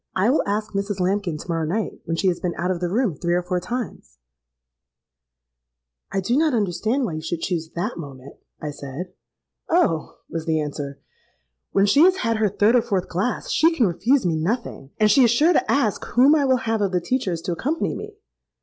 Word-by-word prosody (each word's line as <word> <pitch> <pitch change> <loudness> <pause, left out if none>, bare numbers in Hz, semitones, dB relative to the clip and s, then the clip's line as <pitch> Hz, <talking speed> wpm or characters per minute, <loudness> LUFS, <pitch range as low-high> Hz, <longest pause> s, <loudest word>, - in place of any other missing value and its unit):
I 200 +6 +3
will 295 - +3
ask 210 +1 -2
Mrs. 200 0 -2
Lambkin 185 -3 0
to - - -10
morrow 165 -2 -1
night, 210 +5 -3
when 165 - -2
she 190 - +1
has 175 - -2
been 175 -1 -2
out 180 +2 0
of 180 - -2
the 175 0 -1
room 220 0 +1
three 175 +3 -1
or 180 - 0
four 180 0 -1
times——.'—'I - - -10
do 235 +7 0
not 305 -2 +2
understand 215 +6 0
why 175 - -3
you 155 - -4
should 165 +1 -4
choose 165 -3 -2
that 175 +4 -3
moment,' 140 -3 -10 0.2
I 150 - -4
said.—'Oh!' 160 - -3
was 165 0 -5
the 160 -1 +2
answer, 145 -2 -5 0.7
'when 195 - +3
she 280 +8 +4
has 370 +2 +6
had 230 -11 0
her 215 -1 +2
third 205 +4 +3
or 245 - +5
fourth 200 -6 -2
glass, 195 +8 -2
she 325 +1 +3
can 250 - +3
refuse 200 +8 +2
me 170 -2 +1
nothing; 165 - -3
and 215 -1 +5
she 265 +5 +6
is 235 - +5
sure 300 +10 +4
to - - +1
ask 235 -8 +1
whom 265 +5 +4
I 295 -3 +3
will 260 -1 +3
have 225 -2 -1
of 200 -2 +1
the 180 - +3
teachers 190 -3 -1
to - - -2
accompany 290 - -1
me.' 425 0 -8
185 Hz, 205 wpm, -23 LUFS, 155-230 Hz, 0.7 s, has